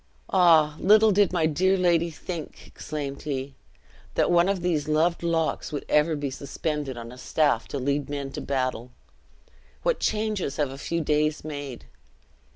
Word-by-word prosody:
"Ah! 160 -5 +5
little 215 +2 +6
did 205 -1 +3
my 175 -3 +1
dear 185 +5 +2
lady 170 -2 +2
think," 165 0 -7
exclaimed 145 -2 -6
he, 140 -2 -4 0.6
"that - - +2
one 175 +2 +4
of 190 -3 -1
these 160 -5 0
loved 160 +3 +2
locks 165 -2 -1
would 145 - -4
ever 150 +2 +3
be 145 -2 -3
suspended 140 0 -4
on 115 0 -8
a 125 - -12
staff 145 -3 +1
to - - -4
lead 140 +2 -1
men 140 -1 -4
to - - -6
battle! 130 -3 -2 0.9
What - - +1
changes 210 -8 -1
have 145 -3 -1
a 135 - -8
few 170 +3 -2
days 150 0 0
made! 145 - -7
155 Hz, 160 wpm, -26 LUFS, 140-175 Hz, 0.9 s, little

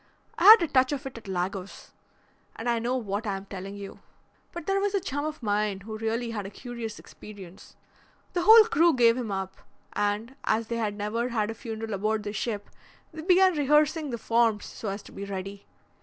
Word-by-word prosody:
I 345 - +1
had 435 -2 +10
a - - 0
touch 260 -2 +3
of 280 0 -5
it 260 -3 -7
at 215 - -17
Lagos, 190 +1 -4 0.6
and 225 - -6
I 235 -1 +2
know 245 +3 -1
what 210 -1 -3
I 195 -1 -1
am 195 - -10
telling 195 0 -7
you. 200 -1 -9 0.5
But 345 -3 -7
there 390 +2 +1
was 405 0 0
a - - +3
chum 290 -6 -3
of 310 -4 -5
mine 205 -2 0
who 215 +2 -7
really 225 +2 -2
had 205 -3 -4
a - - -7
curious 230 0 -7
experience. 195 -4 -13 0.6
The 355 - 0
whole 440 +4 +9
crew 340 -8 +3
gave 230 -2 +5
him 240 -4 -4
up, 190 0 -4 0.4
and, 210 +5 -1
as 220 +1 0
they 235 - -2
had 215 -3 -1
never 215 +4 -2
had 220 -2 -1
a - - -5
funeral 225 -1 -6
aboard 215 +2 -1
the 205 0 -5
ship, 210 -2 -4 0.4
they 315 - -7
began 370 +2 +5
rehearsing 300 +1 +2
the 235 - -3
forms 225 -2 +1
so 215 - -6
as 200 +1 -5
to - - -14
be 200 - -7
ready. 195 0 -6
225 Hz, 210 wpm, -27 LUFS, 205-275 Hz, 0.6 s, had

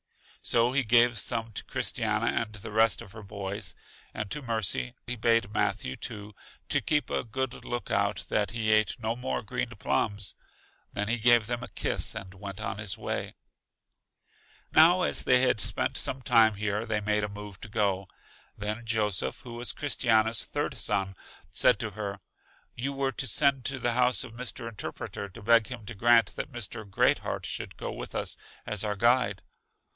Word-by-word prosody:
So 120 +1 +3
he 135 +1 +2
gave 120 0 +4
some 115 -1 0
to - - -3
Christiana - - 0 0.2
and 110 -2 -5
the 105 0 -8
rest 110 -3 +3
of 95 - -13
her 110 - -10
boys, 100 -3 -5 0.4
and 105 -2 -5
to 150 - -2
Mercy; 115 0 0
he 125 - -3
bade 115 -2 +2
Matthew, 65 - 0
too, 105 0 -6 0.3
keep 150 -1 +1
a - - 0
good 130 +2 -4
look 120 0 -4
out 100 0 +1
that 105 -2 +1
he 110 -1 0
ate 110 +3 +3
no 115 0 -1
more 65 - -3
green - - -2
plums; 100 -2 -1 0.6
then 105 0 -2
he 115 +2 0
gave 120 -1 +5
them 120 +1 -3
a - - -6
kiss, - - 0
and 95 -1 -7
went 100 0 -8 0.2
his 105 -3 -1
way. - - -3 1.4
Now, 175 +3 +7
as - - +2
they 125 0 +5
had 125 -4 +3
spent - - +1
some 130 0 0
time 110 -2 +5
here, 105 +2 -2
they 110 -1 0
made 105 0 +1
a 105 - -1
move 105 -1 -9
to 110 - -8
go. 100 -2 0 0.5
Then 105 +3 -3
Joseph, 110 -4 0
who 120 -2 -9
was 120 +1 0
Christiana's 115 -6 +2
third, - - -2
son, 95 -2 -1 0.4
said 125 - +4
to 110 -1 -4
her: 100 -1 -5 0.5
You 130 +4 -3
were 135 -1 0
to 135 +1 -2
send 135 +3 +3
to 140 -1 -1
the 120 -2 0
house 125 0 +3
of 120 -3 -10
Mr. 115 -1 -4
Interpreter 100 -2 -6
to 105 +3 -12
beg 115 0 +5
him 120 -4 -7
to 115 - -6
grant 115 +3 +4
that 145 - -5
Mr. 110 -3 -5
Great - - +3
heart - - -4
should - - -5
go - - -4
with - - -7
us - - -2 0.3
as 105 -1 -2
our 105 -1 -1
guide. 120 -2 +2
110 Hz, 180 wpm, -29 LUFS, 105-120 Hz, 1.4 s, Now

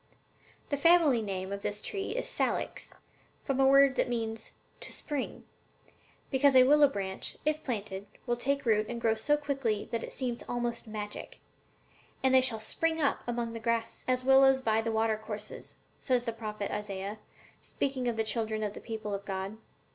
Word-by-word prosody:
"The 285 - 0
family 315 -5 +5
name 190 -2 -3
of 200 - -5
this 205 +1 -3
tree 400 - -4
is - - -2
Salix, - - -2 0.5
from 270 -2 -1
a 270 - +6
word 275 0 +6
that - - +2
means 225 -2 -3 0.3
'to - - -8
spring,' 290 -4 -4 0.9
because 275 0 +4
a 255 - +9
willow 290 +2 +6
branch, 195 -7 -4
if 305 0 0
planted, 205 -5 -4 0.2
will 240 -2 +1
take 275 +3 -1
root 215 -2 +3
and 235 0 -3
grow 225 -1 +2
so 285 +7 +1
quickly 270 -8 -1
that 230 -1 -1
it - - -6
seems 245 -3 -2
almost 240 -1 -2
like - - -10
magic. 210 -1 -6 0.8
'And 265 0 +4
they 260 - +7
shall 245 -4 +1
spring 320 +9 -1
up 285 -3 +2
as - - -21
among 235 -1 -2
the 230 - -5
grass, 230 0 -1
as 255 0 +1
willows 270 0 +6
by 225 -3 +1
the 225 0 -2
watercourses,' 220 -1 -3 0.2
says 250 -3 +1
the 230 -2 -3
prophet 215 -2 -5
Isaiah, 205 0 -4 0.4
speaking 265 -3 -2
of 235 - 0
the 220 - +2
children 220 -1 -1
of 205 -1 -2
the - - -9
people 220 -2 -5
of 200 0 -3
God. 195 +1 -4
235 Hz, 185 wpm, -30 LUFS, 215-270 Hz, 0.9 s, a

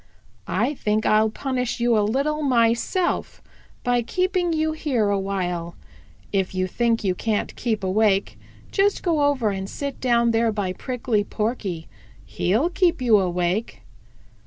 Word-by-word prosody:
I 290 - 0
think 215 -5 -1
I'll 215 +1 +4
punish 250 +1 -3
you 235 0 +3
a 215 - +3
little 280 +8 0
myself 245 - +1 0.4
by 245 -1 +2
keeping 365 - 0
you 315 -1 +1
here 270 -9 0
a 200 -1 +1
while. 180 -3 -3 0.6
If 190 -1 0
you 185 0 +1
think 230 +4 0
you 190 -2 +1
can't 215 +3 -2
keep 220 -4 -2
awake, 195 +1 +2 0.4
just 400 0 +1
go 330 -5 +1
over 260 -7 +1
and 195 0 -4
sit 280 -1 -5
down 235 -2 +3
there 225 0 +2
by 200 -4 -2
Prickly 235 -1 -1
Porky; 205 -7 -3 0.4
he'll 230 - 0
keep 350 -3 +2
you 235 -5 +4
awake." 180 +3 -1
230 Hz, 145 wpm, -23 LUFS, 200-270 Hz, 0.6 s, I'll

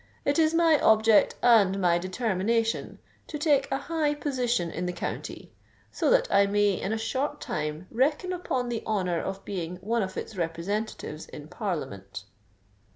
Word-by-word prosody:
It 285 +3 +2
is 315 0 +3
my 330 -3 +4
object 220 0 +4
and 205 -5 +5
my 175 -2 +3
determination 220 +3 -1 0.3
to 300 - -5
take 290 -3 +2
a 270 - +1
high 300 0 -1
position 245 - -1
in 180 +2 -3
the 180 - -2
county—so 175 - -5
that - - +4
I 200 0 +5
may 205 0 +3
in 195 - -2
a 220 - 0
short 270 +6 -2
time 150 +2 -4
reckon 295 +9 +1
upon 260 -9 -2
the 230 -2 -2
honour 180 -6 0
of 195 0 -5
being 180 -3 -4
one 220 +6 -1
of 190 -1 -4
its 220 - -6
representatives 170 -1 -4
in 150 +1 -10
Parliament." 100 - -5
215 Hz, 155 wpm, -27 LUFS, 180-270 Hz, 0.3 s, and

